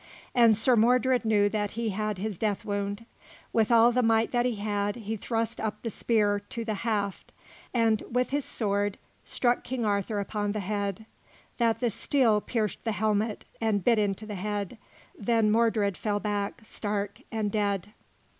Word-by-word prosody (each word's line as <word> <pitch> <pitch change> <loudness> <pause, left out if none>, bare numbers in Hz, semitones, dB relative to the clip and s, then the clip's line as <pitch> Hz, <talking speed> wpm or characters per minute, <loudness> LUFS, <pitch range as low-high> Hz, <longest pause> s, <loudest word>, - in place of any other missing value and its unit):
And 230 -3 +6
Sir 240 +3 +4
Mordred 250 +2 +3
knew 210 -2 +4
that 205 -1 -2
he 230 -1 0
had 210 0 -2
his 205 -1 -4
death 210 -3 -1
wound. 200 +1 -3 0.5
With 225 0 +2
all 235 +1 +7
the 250 +1 +2
might 225 -1 +3
that 245 0 +2
he 245 - -1
had, 205 0 -1
he 220 -2 -4
thrust 225 +2 -2
him 220 - 0
up 210 0 -6
the 230 - -2
spear 205 -2 +1
to 225 +3 -6
the 220 - -1
haft 205 -2 -2 0.4
and, 225 -3 +2
with 250 +1 0
his 285 0 0
sword, 205 -3 -1 0.3
struck 240 -1 +1
King 245 -2 -2
Arthur 205 +1 0
upon 205 0 -2
the 215 - -2
head, 200 +1 -3 0.5
that 230 0 +2
the 240 -2 +1
steel 225 -3 +2
pierced 215 -4 -2
the 225 - -1
helmet 215 0 0 0.2
and 215 -4 +1
bit 235 -3 +4
into 205 0 -1
the 215 - -6
head; 205 +2 -3 0.4
then 220 0 +2
Mordred 220 -3 +2
fell 205 +1 -1
back, 205 0 -2
stark 205 -1 -4
and 215 -2 -1
dead. 205 -1 -1
215 Hz, 175 wpm, -28 LUFS, 205-230 Hz, 0.5 s, all